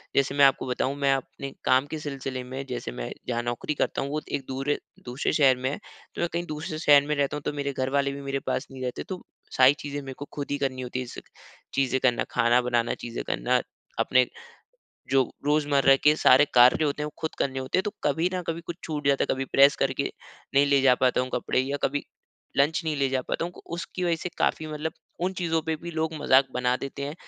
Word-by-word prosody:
जैसे 140 0 +2
मैं 140 -1 +7
आपको 135 -1 +3
बताऊँ 130 +2 -1
मैं 140 -1 +3
अपने 135 +1 -5
काम 130 +2 +4
के 155 - -5
सिलसिले 135 -3 -5
में 130 +2 -6
जैसे 125 - -4
मैं - - -5 0.2
जहाँ 120 -1 0
नौकरी 120 +5 -2
करता - - 0
हूँ 140 - -3
वो 155 0 -1
एक 135 - -2
दूर, 135 +2 -2 0.3
दूसरे 125 +3 -1
शहर 135 -4 +5
में 130 +1 -1
है 145 - -3 0.4
तो - - -3
मैं 170 - +2
कहीं 175 +1 -1
दूसरे 155 +1 -5
शहर 145 -3 +6
में 150 - 0
रहता 140 +1 0
हूँ - - -7
तो - - -1
मेरे 140 -1 -2
घर 130 0 -1
वाले 140 0 +1
भी 140 0 -7
मेरे 140 0 -2
पास 140 - -1
नहीं 130 -1 -9
रहते 125 - -3
तो 185 -1 -5 0.4
सारी 130 +2 +7
चीज़ें 145 0 -5
मेरे 135 -1 -7
को 145 - -5
खुद 145 -1 -4
ही 145 - 0
करनी 130 -2 -2
होती 125 0 -4
है 130 - -3
जैसे - - -9 0.5
चीज़ें 130 -1 +1
करना 125 -2 +3
खाना 120 +2 +3
बनाना, 120 -1 0
चीज़ें 120 0 -6
करना, - - +1 0.4
अपने 130 -1 +4 0.8
जो 135 -2 +3 0.2
रोज़मर्रा 145 -2 +4
के 150 +1 +7
सारे 135 0 +6
कार्य 125 +5 +6
होते 150 0 -1
हैं - - -1
वो 150 - -7
खुद 160 - -3
करने 135 -1 -1
होते 130 +6 -1
हैं 185 - +2
तो 210 - -2
कभी 160 +5 +1
न 180 - -2
कभी 165 +1 -2
कुछ 170 - -5
छूट 150 -3 -4
जाता 140 - +3
है - - +2
कभी 135 0 -3
प्रेस 140 +1 +7
करके 135 +1 0 0.4
नहीं 140 +1 +5
ले 140 -1 +4
जा 130 -2 +6
पाता 125 0 +2
हूँ 130 0 -3
कपड़े, 130 - +1
या 140 +2 -2
कभी 145 +1 0 0.5
लंच 145 +5 +3
नहीं 155 -2 -1
ले 135 -1 +1
जा 130 -1 +1
पाता 165 - -2
हूँ 175 - -5
उ - - -11
उसकी 180 +1 -4
वजह 170 -1 +2
से 180 - -4
काफ़ी 155 - +1
मतलब 155 +1 -4 0.3
उन 190 - 0
चीज़ों 165 -2 +1
पे 160 0 -1
भी 170 +2 -8
लोग 160 0 -2
मज़ाक 135 +1 +5
बना 125 0 +1
देते 140 +1 -6
हैं 145 +2 -5
140 Hz, 240 wpm, -26 LUFS, 130-150 Hz, 0.8 s, मैं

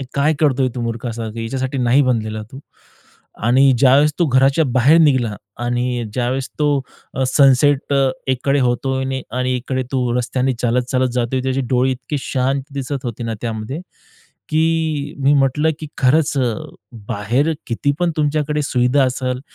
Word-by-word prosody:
हे 135 - -4
काय 145 +3 +2
करतोय 135 -4 +2
तू 125 - -4
मूर्खासारखं, 115 -1 -4
याच्यासाठी 130 +4 -3
नाही 125 +3 +3
बनलेला 110 -4 -1
तू 135 - -9 0.8
आणि 130 +3 +5
ज्यावेळेस 140 +3 +5
तो 170 - +3
घराच्या 135 +3 +3
बाहेर 130 +5 +4
निघाला. 130 -9 +2 0.3
आणि 120 0 -1
ज्यावेळेस 130 +1 -1
तो 150 - +3 0.5
अ, 130 - -1
सनसेट 140 +1 +3
अ, 135 -1 +3 0.2
एकीकडे 135 +2 +1
होतोय 130 +1 -1 0.2
आणि 125 0 0
इकडे 130 +1 -3
तू 125 -2 0
रस्त्याने 130 +2 0
चालत-चालत 125 +2 +1
जातोय. 125 +1 0
त्याची 130 +1 -1
डोळे 125 +1 +3
इतकी 130 +4 -5
शांत 135 +1 -1
दिसत 135 -1 -4
होती 120 0 -5
ना 115 - -3
त्यामध्ये, 115 +6 -4 0.7
की 155 -2 0
मी 140 - +4
म्हटलं 140 +3 +2
की 155 - -5
खरंच 140 +2 +2
अ, 130 - +2 0.7
बाहेर 120 +9 0 0.2
किती 140 +5 0
पण 175 -1 +2
तुमच्याकडे 150 0 0
सुविधा 130 +1 +2
असेल, 130 0 -2
130 Hz, 150 wpm, -19 LUFS, 125-140 Hz, 0.8 s, आणि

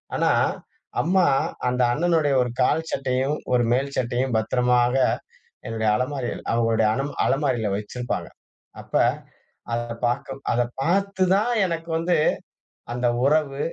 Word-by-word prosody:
ஆனா, - - +2 0.7
அம்மா 185 +2 +3 0.4
அந்த 125 +1 0
அண்ணனுடைய 160 -1 +2
ஒரு 125 - 0
கால் 160 +5 +2
சட்டையும் 135 +2 0 0.2
ஒரு 120 - +4
மேல் 140 +2 -1
சட்டையும் 125 0 0
பத்திரமாக 125 +2 +2 0.7
என்னுடைய 110 -1 -1
அலமாரியில் 130 -1 -3
அவுங்களுடைய 115 -1 +2
அல 135 - -1 0.2
அலமாரியில 130 -6 +1
வச்சிருப்பாங்க. 115 +4 -4 0.5
அப்ப - - -16 0.8
அதை 120 0 -2
பாக்க 125 +2 -2 0.2
அதை 120 0 +2 0.2
பாத்து 195 +4 +1
தான் 220 +5 +1
எனக்கு 165 -1 -4
வந்து 170 +1 +1 0.8
அந்த 125 0 0 0.2
உறவு 145 -2 +1
130 Hz, 120 wpm, -24 LUFS, 120-155 Hz, 0.8 s, ஒரு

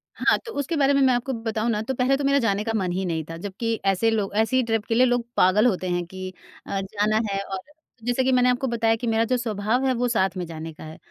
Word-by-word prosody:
हाँ, - - +3
तो 455 - -6
उसके 285 +4 -2
बारे 280 -1 +3
में 275 - +3
मैं 260 -1 +5
आपको 245 +2 -1
बताऊँ 225 0 -1
ना, 210 -1 -1
तो 265 +4 -3
पहले 255 +2 +2
तो 285 - -3
मेरा 280 0 +3
जाने 210 -4 0
का 225 - -2
मन 190 -4 0
ही 190 +2 -2
नहीं 165 -2 -2
था, 165 - -6
जबकि 225 +4 -2
ऐसे 195 +3 +2
लोग, 205 -3 -1
ऐसी 255 +4 +3
ट्रिप 225 -2 0
के 225 - -1
लिए 250 +2 +5
लोग 245 -1 +1
पागल 190 +5 +4
होते 185 -5 -1
हैं 175 0 -1
कि 185 +1 -7 0.4
अ, 195 - -2
जाना 210 +2 0
है 195 - -1
और 195 -1 -5 0.4
जैसे 245 +2 +1
कि 265 - +2
मैंने 250 -1 +4
आपको 250 +2 0
बताया 225 -2 +1
कि 240 - -2
मेरा 225 0 +2
जो 255 +2 +1
स्वभाव 225 +2 -1
है, 260 - +2
वो 245 0 0
साथ 225 -5 +2
में 180 - -3
जाने 160 -1 -7
का - - -12
है, 155 0 -9
225 Hz, 275 wpm, -24 LUFS, 195-250 Hz, 0.4 s, मैं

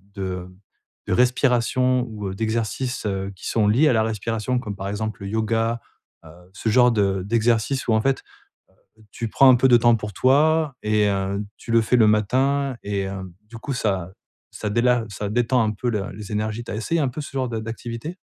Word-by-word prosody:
de 90 -2 -4 0.6
de - - 0
respiration 125 0 +2
ou, 105 -2 -6
heu, 95 - -6
d'exercices, 115 +3 -2
heu, 95 0 -3
qui - - -8
sont 110 -2 +1
liés 130 +9 +4
à 125 - +4
la 110 -1 +3
respiration 115 +3 -2
comme 105 -5 -6
par 95 0 -6
exemple 110 0 -4
le 100 - -5
yoga, 115 +1 0 0.4
heu, - - -12 0.2
ce 110 - -2
genre 125 +2 +5
de 100 -4 +1
d'exercices 115 +4 0
où, 110 - +3
en 110 - +3
fait, 135 +1 0 0.8
heu, - - -19
tu 115 - -4
prends 135 +4 +5
un - - +7
peu 130 +2 +3
de 120 - +7
temps 120 0 +4
pour 105 -1 -6
toi 150 - +3
et 105 -1 +2
heu, 100 0 -1 0.2
tu - - -10
le 115 -1 +5
fais 115 - -1
le 110 -3 +5
matin 130 +5 +1
et 100 -1 -2
heu, 95 -2 -7 0.2
du 115 -1 -10
coup 135 +3 -4
ça 95 -6 -1 0.4
ça 105 - -5
déla 120 +1 +2
ça 100 +1 -4
détend 120 +1 +2
un 110 - +1
peu 120 +4 -4
le 105 -3 -3
les 105 +1 -9
énergies. 110 +2 -2
Tu - - -6
as - - -3
essayé 160 +9 -1
un 135 - +1
peu 130 +5 -6
ce 145 - -7
genre 130 -2 -1
de 115 -2 -3
d'activité? 115 +8 -6
115 Hz, 215 wpm, -23 LUFS, 105-125 Hz, 0.8 s, un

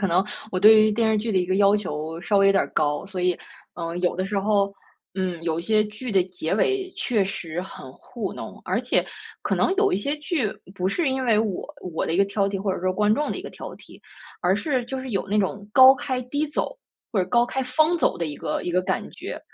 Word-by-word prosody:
可 200 - +2
能 180 +3 +3 0.3
我 185 - -1
对 215 +2 +8
于 215 - +4
电 225 +1 +2
视 215 - +2
剧 225 +2 -2
的 200 - 0
一 180 - +1
个 185 +1 0
要 200 +1 +5
求 160 -4 -4
稍 205 0 +2
微 195 - +5
有 195 - +6
点 195 - +3
儿 - - -11
高。 150 +2 0
所 190 -2 -5
以， 180 -1 +2 0.4
呃， 170 -1 -4
有 180 0 0
的 185 - -1
时 200 +1 -1
候， 200 -1 +2 0.4
嗯， 185 -3 -3
有 165 -1 -1
一 - - -8
些 215 +3 +2
剧 215 +4 -7
的 190 -3 +3
结 180 -2 -3
尾 385 - +1
确 225 -5 +1
实 175 -3 -4
很 155 -8 -9
糊 225 - -6
弄， - - -8
而 - - 0
且 - - +1 0.4
可 - - 0
能 - - +2
有 400 -1 +3
一 - - +3
些 280 +9 -2
剧 300 - -1 0.3
不 185 0 -1
是 285 - 0
因 265 0 -1
为 225 -4 +4
我 215 -4 -1 0.3
我 - - -1
的 165 - -1
一 - - +1
个 195 - +5
挑 200 0 0
剔 200 - -2
或 195 0 -1
者 - - -5
说 185 +1 +1
观 210 +2 +3
众 295 +5 -1
的 - - -3
一 - - -6
个 - - -7
挑 - - -8
剔， - - -15 0.4
而 185 +3 +2
是 260 +2 0
就 265 +2 -4
是 260 -1 -6
有 195 -1 -1
那 210 +2 +1
种 200 +1 -2
高 260 +3 +9
开 255 -1 -3
低 285 +5 -2
走， 295 - -3 0.3
或 215 - +1
者 180 - -5
高 240 +4 +4
开 265 +2 -2
方 310 +7 +2
走 - - +2
的 170 - -2
一 150 -2 -4
个 150 - -3
一 - - -2
个 180 +1 +2
感 185 - -2
觉。 - - -7
200 Hz, 285 characters per minute, -24 LUFS, 185-245 Hz, 0.4 s, 高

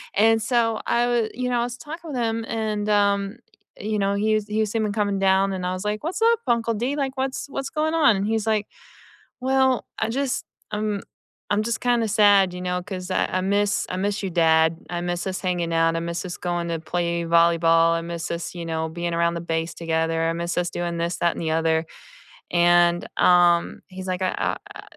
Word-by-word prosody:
and 225 +1 +4
so 225 -1 +1
I 240 +1 +2 0.2
wa - - -2
you 250 +1 -2
know, 245 -1 +1
I - - +1
was 245 0 -5
talking 320 +5 -8
with 260 - -3
him 225 -1 -1
and, 215 -2 -2
um, 200 +1 +2 0.4
you 215 0 -2
know, 200 0 +1
he 215 +2 +2
was 215 -1 -2
he 215 +1 -2
was 215 -1 -1
seeming 215 -2 -1
coming 205 -2 0
down, 195 0 +3
and 185 -1 -4
I 180 - -1
was 185 +1 -5
like, 210 +5 -2
"What's 350 +7 -3
up, 460 0 +4
Uncle 235 -1 +1
D? 245 +7 -1
Like, 270 -2 -2
what's 265 +1 -2
what's 275 0 -4
going 310 +1 -1
on?" 290 -9 +5
And 200 +2 -1
he's 220 -1 0
like, 215 -2 +1 0.7
"Well, 265 -1 +2
I 220 - 0
just 270 +2 -1 0.3
I'm 210 -1 -2 0.5
I'm 210 +1 +1
just 235 0 -2
kinda 240 -2 +2
sad, 205 -3 +5
you 180 - -6
know, 180 0 -2
'cause 185 -1 -6
I - - +2
I 185 - 0
miss 205 +2 +1
I 185 - -3
miss 200 +2 -1
your 195 - -1
dad, 160 -1 +3
I 175 -1 -3
miss 175 0 -3
us 185 - -3
hanging 175 -3 -1
out, 165 0 +2
I - - 0
miss 170 +2 -4
us 175 - -5
going 175 -1 -2
to 165 -1 -2
play 170 +1 -2
volleyball, 165 0 +4
I 165 - -1
miss 170 -1 -5
us, 170 -1 -4
you 170 -1 -5
know, 160 -1 -2
being 170 +1 -3
around 170 0 +1
the 170 - -4
base 165 0 -2
together, 165 0 -1
I - - 0
miss 170 +1 -3
us 175 0 +1
doing 175 -1 -3
this, 170 +1 -2
that 170 -1 +2
and - - -5
the 160 -1 -1
other," 160 0 +1 0.7
and, 175 0 +4
um, 175 -1 +4
he's 185 0 -8
like, 185 0 -2
"I, 185 - +1
uh - - -1 0.2
I - - -9
190 Hz, 225 wpm, -23 LUFS, 170-220 Hz, 0.7 s, on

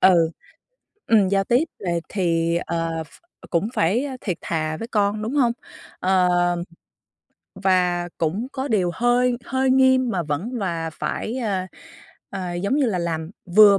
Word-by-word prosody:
ừ, 170 -3 +5 0.8
ừm, 210 -4 +4
giao 195 0 +2
tiếp 245 +8 +3
về 175 -4 -1
thì, 170 -3 +1
ờ, 165 -1 -2
ph - - -21 0.4
cũng 180 +5 +1
phải, 210 +12 +2
a, 265 -2 -5
thiệt 185 -5 -3
thà 155 -1 -2
với 230 - -6
con, 210 -1 +1
đúng 235 +6 -3
hông? 245 -5 +3 0.5
Ờ, 185 -1 +3 1.3
và 180 -2 +1
cũng 180 +9 -1
có 265 +1 -3
điều 190 -6 +2
hơi 245 +3 +2
hơi 265 0 +1
nghiêm 260 -1 +4
mà 180 -4 0
vẫn 165 - -3
và 170 -5 -2
phải, 220 +8 -3
a, 195 -6 -1 0.6
à, 185 -3 -4
giống 200 +9 0
như 285 -4 +3
là, 190 -5 0
làm 165 -1 -2 0.3
vừa 205 -2 +9
190 Hz, 155 wpm, -23 LUFS, 170-235 Hz, 1.3 s, vừa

